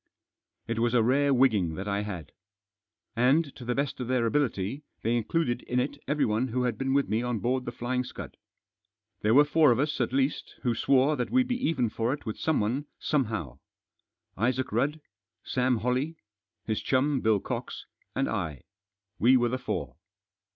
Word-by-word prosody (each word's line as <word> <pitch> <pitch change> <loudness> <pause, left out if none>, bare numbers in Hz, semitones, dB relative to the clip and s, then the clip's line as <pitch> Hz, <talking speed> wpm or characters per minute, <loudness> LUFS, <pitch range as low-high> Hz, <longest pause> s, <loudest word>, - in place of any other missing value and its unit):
It 115 0 -2
was 120 +1 +2
a 115 - +5
rare 140 +4 +3
wigging 110 -11 +3
that 95 +4 -5
I 100 0 0
had. 90 -8 -6 0.8
And, 135 +5 +2
to 125 - -10
the 120 0 -1
best 140 -1 -2
of 125 - -3
their 125 -2 +1
ability, 125 -1 0 0.2
they 115 +2 +1
included 120 +2 0
in 125 - -1
it 140 +3 -2
everyone 130 -5 +1
who 125 +1 -1
had 125 -3 0
been 135 +2 -1
with 140 - +2
me 110 +2 0
on 120 -1 -1
board 125 +3 -1
The - - -3
Flying 125 +1 -2
Send. - - -8 0.9
There 110 +3 +3
were 145 +2 +7
four 150 -2 +5
of 115 - +3
us, 145 +1 0
at 120 - 0
least, 135 +2 -1
who 120 -3 +2
swore 135 +5 +3
that 125 - -2
we'd 255 0 +3
be 250 0 -2
even 130 -7 +1
for 115 +3 0
it 145 - -7
with 110 - -5
someone 140 -1 0
somehow. 110 - -1 0.8
Isaac 125 +4 0
Rudd, 140 +8 0 0.4
Sam 125 -1 +1
Holley, 130 +8 -1 0.5
his 110 -1 -1
chum, 135 +1 +1
Bill 110 -2 +3
Cox, - - -5 0.3
and - - +1
I; 75 -4 -3 0.6
we 130 +3 +6
were 120 -1 +2
the 130 +2 -2
four. - - -4
125 Hz, 180 wpm, -28 LUFS, 115-140 Hz, 0.9 s, were